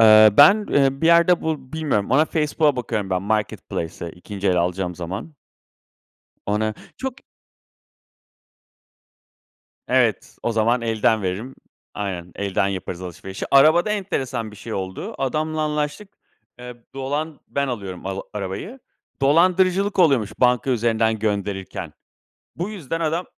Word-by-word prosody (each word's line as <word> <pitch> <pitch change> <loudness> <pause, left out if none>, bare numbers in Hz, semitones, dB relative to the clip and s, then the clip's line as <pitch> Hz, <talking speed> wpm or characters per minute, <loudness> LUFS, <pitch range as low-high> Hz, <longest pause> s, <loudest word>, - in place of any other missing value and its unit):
Eee, 110 -1 +8
ben, 205 +8 +7
e, 135 -1 +3
bir 165 - +2
yerde 170 +1 +5
bu 150 -4 -3
bilmiyorum, 145 -10 -1
ona 150 +4 +5
Facebook'a 150 -2 +1
bakıyorum 110 -5 -3
ben 90 0 0
marketplace'e 100 -5 -3
2’nci 95 +3 -4
el 90 - +2
alacağım 90 +1 -1
zaman. 95 - -6 1.1
Ona 110 +1 0 0.2
çok 265 -2 -4 2.7
Evet, - - +1
o 120 - +1
zaman 115 +2 +2
elden 110 -1 +1
veririm. 100 +8 -4 0.4
Aynen. 90 -4 -4
Elden 100 0 0
yaparız 95 -2 -4
alışverişi. 95 +1 -7
Arabada 155 +8 +6
enteresan 130 - -2
bir 105 - -13
şey 110 +2 -7
oldu. 95 -1 -5
Adamla 155 +4 -1
anlaştık, 150 +6 -2 0.5
eee, 125 0 -9 0.2
dolan 145 +3 -3
ben 140 -1 -1
alıyorum 100 -7 -5
al 95 0 -3
arabayı. 105 - -5 0.4
Dolandırıcılık 185 +6 +3
oluyormuş 130 - +4
banka 125 +1 +3
üzerinden 115 -2 +1
gönderirken. 100 -2 -3 0.6
Bu 175 +5 -3
yüzden 165 -5 -4
adam 165 +2 -1
120 Hz, 125 wpm, -22 LUFS, 100-155 Hz, 2.7 s, Eee